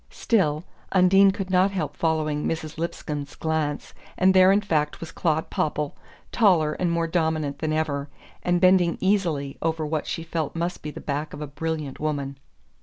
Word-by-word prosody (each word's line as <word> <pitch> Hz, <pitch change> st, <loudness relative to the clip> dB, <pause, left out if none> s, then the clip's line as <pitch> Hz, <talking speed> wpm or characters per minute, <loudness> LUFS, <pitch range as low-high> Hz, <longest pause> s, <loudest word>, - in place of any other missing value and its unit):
Still, 160 Hz, -9 st, +1 dB, 0.3 s
Undine 195 Hz, +1 st, +6 dB
could 195 Hz, -1 st, -3 dB
not 185 Hz, +1 st, +4 dB
help 180 Hz, -7 st, -3 dB
following 155 Hz, -2 st, 0 dB
Mrs. 160 Hz, -1 st, -3 dB
Lipscomb's 150 Hz, -3 st, -4 dB
glance, 160 Hz, -2 st, -2 dB, 0.2 s
and 190 Hz, +1 st, +4 dB
there 185 Hz, 0 st, +7 dB
in 200 Hz, -, +4 dB
fact 155 Hz, -7 st, -1 dB
was 165 Hz, -, -7 dB
Claud 160 Hz, -2 st, -1 dB
Popple, 150 Hz, -1 st, -1 dB, 0.4 s
taller 175 Hz, -9 st, +3 dB
and 175 Hz, +1 st, -1 dB
more 170 Hz, 0 st, +1 dB
dominant 160 Hz, -4 st, -1 dB
than 155 Hz, -1 st, -1 dB
ever, 150 Hz, -2 st, -1 dB, 0.3 s
and 175 Hz, 0 st, +1 dB
bending 180 Hz, -1 st, +4 dB
easily 170 Hz, -9 st, 0 dB
over 160 Hz, -1 st, -1 dB
what 155 Hz, 0 st, -2 dB
she 165 Hz, -, -3 dB
felt 165 Hz, -2 st, -3 dB
must 170 Hz, +2 st, -2 dB
be 150 Hz, -, -5 dB
the -, -, -8 dB
back 150 Hz, +2 st, -3 dB
of -, -, -9 dB
a -, -, -3 dB
brilliant 155 Hz, -1 st, -4 dB
woman. 140 Hz, -3 st, -3 dB
160 Hz, 175 wpm, -25 LUFS, 150-180 Hz, 0.4 s, there